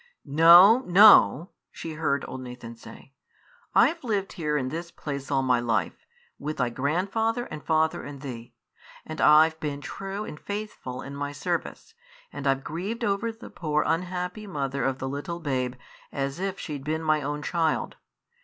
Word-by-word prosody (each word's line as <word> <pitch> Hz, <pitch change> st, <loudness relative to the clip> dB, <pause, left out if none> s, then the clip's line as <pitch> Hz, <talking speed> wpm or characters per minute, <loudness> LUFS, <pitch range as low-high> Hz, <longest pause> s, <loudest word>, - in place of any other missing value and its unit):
"No, 170 Hz, -, +8 dB
no!" 180 Hz, -, +7 dB, 0.2 s
she 165 Hz, -, -7 dB
heard 145 Hz, -3 st, -1 dB
old 130 Hz, -, -7 dB
Nathan 125 Hz, -2 st, -9 dB
say; 125 Hz, +3 st, -14 dB, 0.6 s
"I've 335 Hz, -2 st, +4 dB
lived 205 Hz, -5 st, -2 dB
here 150 Hz, -4 st, -1 dB
in 130 Hz, -2 st, -2 dB
this 165 Hz, +4 st, -5 dB
place 140 Hz, -4 st, -6 dB
all 135 Hz, -2 st, +1 dB
my 125 Hz, -2 st, +3 dB
life, 120 Hz, -1 st, -2 dB, 0.3 s
with 155 Hz, +1 st, -4 dB
thy 125 Hz, -2 st, 0 dB
grandfather 195 Hz, -, -1 dB
and 150 Hz, -, -7 dB
father 160 Hz, 0 st, +1 dB
and 140 Hz, -1 st, -9 dB
thee, 120 Hz, -4 st, -8 dB, 0.5 s
and 155 Hz, 0 st, -6 dB
I've 160 Hz, +1 st, +5 dB
been 145 Hz, -2 st, -4 dB
true 195 Hz, +7 st, -6 dB
and 150 Hz, -, -9 dB
faithful 205 Hz, -11 st, -6 dB
in 140 Hz, +1 st, -8 dB
my 145 Hz, 0 st, -4 dB
service, 170 Hz, -, -4 dB, 0.4 s
and 140 Hz, -, -4 dB
I've 135 Hz, 0 st, +1 dB
grieved 200 Hz, +9 st, -4 dB
over 210 Hz, +2 st, 0 dB
the 225 Hz, +1 st, -13 dB
poor 150 Hz, -2 st, -1 dB
unhappy 180 Hz, +5 st, -2 dB
mother 140 Hz, -6 st, -3 dB
of 135 Hz, 0 st, 0 dB
the 130 Hz, -, -4 dB
little 145 Hz, +5 st, -5 dB
babe 130 Hz, -5 st, -2 dB, 0.4 s
as 140 Hz, +3 st, -3 dB
if 195 Hz, 0 st, -3 dB
she'd 145 Hz, -4 st, -6 dB
been 160 Hz, +2 st, -2 dB
my 155 Hz, -1 st, +2 dB
own 145 Hz, +1 st, -4 dB
child. 165 Hz, -1 st, -1 dB
155 Hz, 165 wpm, -26 LUFS, 140-180 Hz, 0.6 s, No